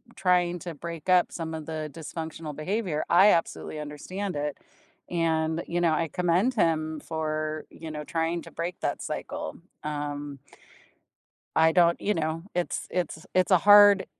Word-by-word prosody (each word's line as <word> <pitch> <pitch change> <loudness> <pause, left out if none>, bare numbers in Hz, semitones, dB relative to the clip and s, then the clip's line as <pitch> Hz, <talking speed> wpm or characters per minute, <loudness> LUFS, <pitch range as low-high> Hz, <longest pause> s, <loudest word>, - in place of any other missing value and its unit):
trying 180 -2 +2
to 170 -2 -7
break 170 +2 -7
up 180 -1 +4
some 160 -1 -5
of 155 -1 -6
the 155 -1 -4
dysfunctional 160 -1 -6
behavior, 175 -1 -1
I 190 +4 +7
absolutely 160 -2 -1
understand 180 +6 -5
it. 145 0 -2 0.5
And, 160 -1 0
you 175 +1 -1
know, 165 -2 +3
I 165 +1 +1
commend 180 +8 +2
him 155 -4 +1
for, 155 -1 -3
you 160 -1 -9
know, 150 0 -5
trying 165 +2 -1
to - - -12
break 175 +2 -4
that - - -1
cycle, - - -5 0.3
um 145 -2 -4 1.2
I 160 0 +5
don't 170 -1 +4
you 210 - +1
know, 160 0 -2
it's 175 -1 -2
it's 180 -1 -3
it's 185 +1 +3
a 185 - +7
hard 205 0 +7
165 Hz, 155 wpm, -27 LUFS, 155-180 Hz, 1.2 s, I